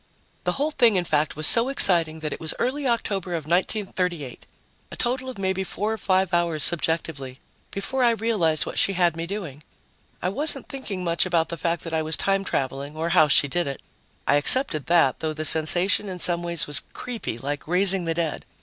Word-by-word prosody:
The - - 0
whole 290 +3 -2
thing, 240 -7 +3
in 180 - +1
fact, 155 -3 -1
was 155 +1 +2
so 230 +9 +5
exciting 170 - +4
that 155 -1 -4
it - - -8
was 160 - -2
early 265 +3 -2
October 195 -7 -2
of 160 -3 -5
1938 180 - -3 0.4
a - - -8
total 255 +2 -3
of 255 - -9
maybe 190 0 -2
four 210 +3 -3
or - - -5
five 190 -1 0
hours 170 -3 0
subjectively 160 -6 -2 0.3
before 255 +7 -3
I 240 - +4
realized 215 -9 0
what - - -3
she 195 - +2
had 175 -2 +1
me 165 0 -5
doing. 170 -8 -7 0.6
I 180 - -2
wasn't 275 +6 +1
thinking 260 -10 -6
much 170 +1 0
about 170 -2 0
the 170 - -4
fact 170 +1 -3
that 165 - -7
I 160 - 0
was 155 0 -2
time 195 0 0
traveling 140 -2 -4
or 165 +1 -2
how 155 -2 +4
she 145 0 +4
did 175 +3 -2
it; 140 - -5 0.5
I 145 - +3
accepted 155 - +5
that, 165 -7 +2
though 160 -1 -3
the 155 0 -4
sensation 175 +6 +2
in 185 - -6
some 175 0 +5
ways 170 -2 -3
was 145 -3 -1
creepy, 235 - -6
like 145 +4 -6
raising 185 +1 +3
the 165 0 -2
dead. 165 -2 -3
175 Hz, 205 wpm, -23 LUFS, 155-200 Hz, 0.6 s, so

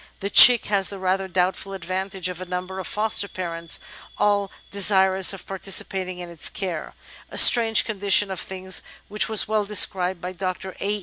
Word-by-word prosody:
The 200 0 -5
chick 245 +1 +9
has 200 -2 0
the 200 - -7
rather 190 +1 -2
doubtful 185 +2 -3
advantage 190 0 -5
of 180 -1 -7
a - - -6
number 180 +1 -6
of 185 - -6
foster 210 -1 -1
parents 170 -4 -4 0.4
all 205 -1 0 0.2
de 200 - -5
sirous 190 -1 +4
of 195 -2 -10
participating 190 -1 -2
in 175 -1 -8
its 170 -3 -3
care, 180 -5 -6 0.3
a - - -10
strange 225 -3 +5
condition 205 -1 +1
of 190 - -4
things 190 0 -2 0.3
which 210 +2 -1
was 220 -1 +1
well 215 0 -1
described 190 -3 +1
by 180 +2 -7
Dr. 185 0 -6
A. 205 +1 -2
190 Hz, 180 wpm, -22 LUFS, 185-200 Hz, 0.4 s, chick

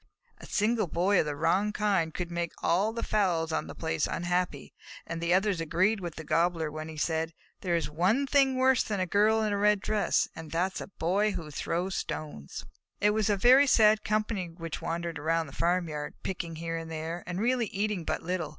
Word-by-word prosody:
A - - -11
single 215 -1 +1
Boy 180 +4 +2
of - - +1
the 145 - -2
wrong 195 +7 +1
kind 200 -6 +1
could 175 +1 -5
make 170 -1 -2
all 190 +6 +2
the 230 0 -4
fowls 175 -6 +1
on 160 - -1
the - - -8
place 160 -2 -1
unhappy, 175 -4 -2 0.3
and 165 0 -5
the 170 +1 0
others 190 -1 +2
agreed 185 +7 +1
with 175 -4 -6
the 160 - -7
Gobbler 165 -1 +1
when 155 +1 -6
he 160 - -9
said, 160 +1 -1 0.2
"There 175 -2 0
is 165 -3 0
one 185 - +1
thing 270 -1 +3
worse 260 -1 +4
than 205 -3 -2
a 185 - +1
Girl 215 +4 +3
in 210 -1 0
a 200 - -1
red 210 0 +4
dress, 205 -2 +1
and 160 -1 -8
that 180 +3 0
is - - -5
a - - -6
Boy 200 +3 0
who 165 -5 -6
throws 175 +5 -2
stones." 145 - -5 0.3
It 210 +1 +4
was 215 0 +1
a 205 - +2
very 255 +7 +6
sad 215 -3 +5
company 210 -4 -1
which 165 -1 -7
wandered 170 -1 -3
around 165 +2 0
the 140 - -12
farmyard, 165 -4 -1
picking 170 -3 -4
here 165 +1 -4
and 165 0 -6
there, 165 +2 -5
and 180 +1 -3
really 240 +1 +1
eating 200 -2 -2
but - - -2
little. 170 -2 -2
180 Hz, 215 wpm, -29 LUFS, 165-210 Hz, 0.3 s, very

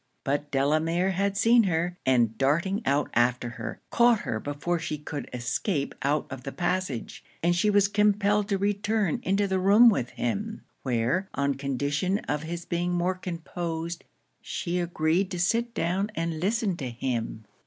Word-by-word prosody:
But 145 +1 -1
Delamere 155 +7 +1
had 200 +1 0
seen 230 +1 +5
her; 175 0 0
and 120 -4 +3
darting 170 - +1
out 140 +2 +1
after 120 0 +2
her, 115 -2 -6
caught 235 -2 +4
her 110 - -2
before 145 +7 -2
she 155 - -3
could 150 0 -6
escape 140 - -1
out 145 +3 +1
of 130 -1 -6
the 135 - -6
passage, 175 -8 -2 0.2
and 175 +1 +3
she 210 +4 +2
was 205 -1 +4
compelled 205 0 +2
to 200 - +2
return 205 -1 0
into 195 +2 +1
the 190 -1 0
room 205 +6 +7
with 125 - 0
him; 215 - -3 0.2
where, 130 +10 0
on 140 0 +1
condition 145 +7 -1
of 150 0 -1
his 170 +2 -5
being 175 +1 -1
more 175 +1 +1
composed, 170 -2 -5 0.4
she 180 -4 -3
agreed 175 +2 +1
to 180 - -4
sit 230 +6 +1
down 185 +5 0
and 165 -1 -2
listen 205 +1 0
to 130 -6 -4
him. 115 -2 -3
170 Hz, 165 wpm, -27 LUFS, 140-195 Hz, 0.4 s, room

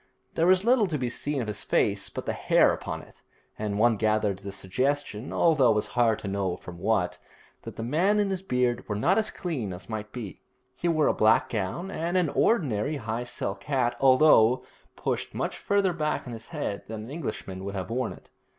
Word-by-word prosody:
There 165 - +2
was 185 +2 +4
little 235 -3 +4
to 155 -4 -2
be 125 -3 -2
seen 145 +1 -2
of - - -6
his 105 - -4
face - - +1
but - - -6
the - - -1
hair - - +4
upon - - -5
it, - - -19 0.4
and 105 -1 -2
one 115 0 +4
gathered 105 -2 +1
the 100 0 -7
suggestion, 120 +5 -2
although 150 -7 +4
it 110 - +4
was 105 - +1
hard 115 -3 +2
to - - -6
know 95 -2 -1
from 85 -1 -10
what, 90 -4 0 0.4
that - - -9
the 115 - -5
man 175 - +2
and 200 -1 +1
his 190 -1 -2
beard 125 -10 0
were 105 - -1
not 180 - +3
as 220 - 0
clean 140 - -4
as 90 +1 -10
might 105 -1 -5
be. 110 -9 -7 0.3
He 175 - -2
wore 155 -3 +3
a - - +3
black 130 +5 +3
gown 115 - -3
and 170 +2 -1
an 175 -4 +2
ordinary 145 - +1
high 115 -1 -3
silk 100 -4 -5
hat, 130 -4 +1
although 130 -3 +5 0.3
pushed - - -3
much - - -3
farther 200 -3 +1
back 150 -3 -2
on 125 - -7
his 115 0 -8
head 145 -11 -4
than 110 -1 -6
an 115 - -9
Englishman 105 - -5
would 100 +1 -5
have 95 +3 -4
worn 125 0 -1
it. - - -14
120 Hz, 215 wpm, -27 LUFS, 105-155 Hz, 0.4 s, although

